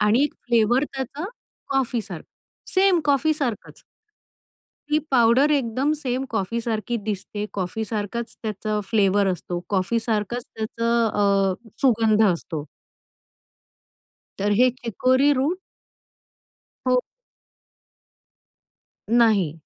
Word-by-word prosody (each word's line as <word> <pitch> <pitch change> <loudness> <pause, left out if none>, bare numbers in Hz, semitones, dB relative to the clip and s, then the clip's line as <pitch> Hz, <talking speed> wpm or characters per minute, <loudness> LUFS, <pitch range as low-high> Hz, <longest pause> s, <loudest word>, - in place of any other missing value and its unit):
आणि 215 +5 +4
एक - - -3
फ्लेव्हर 240 +3 +3
त्याचा 270 +5 -4 0.4
कॉफीसारखं, 235 - -2 0.5
सेम 375 -2 +4
कॉफीसारखंच. 285 -4 0 1.1
ती 300 0 +3
पावडर 255 +3 +4
एकदम 270 +1 +1
सेंम 260 -1 -2
कॉफी 220 +3 -1
सारखी 230 +1 -2
दिसते, 205 0 -3
कॉफी 195 +3 -3
सारखाच 220 +2 -4
त्याचा 215 0 -2
फ्लेवर 200 -2 +3
असतो, 175 0 -5
कॉफी 200 +4 +1
सारखंच 225 +1 -2
त्याचं 230 +1 0
अ, 200 -2 +2 0.3
सुगंध 225 -4 +4
असतो. 160 -3 -5 1.7
तर 205 +1 +1
हे 255 0 +6
चिकोरी 255 +4 +2
रूट 290 +7 0 1.3
हो. 255 0 +4 2.1
नाही. 215 -9 +4
230 Hz, 95 wpm, -23 LUFS, 210-260 Hz, 2.1 s, हे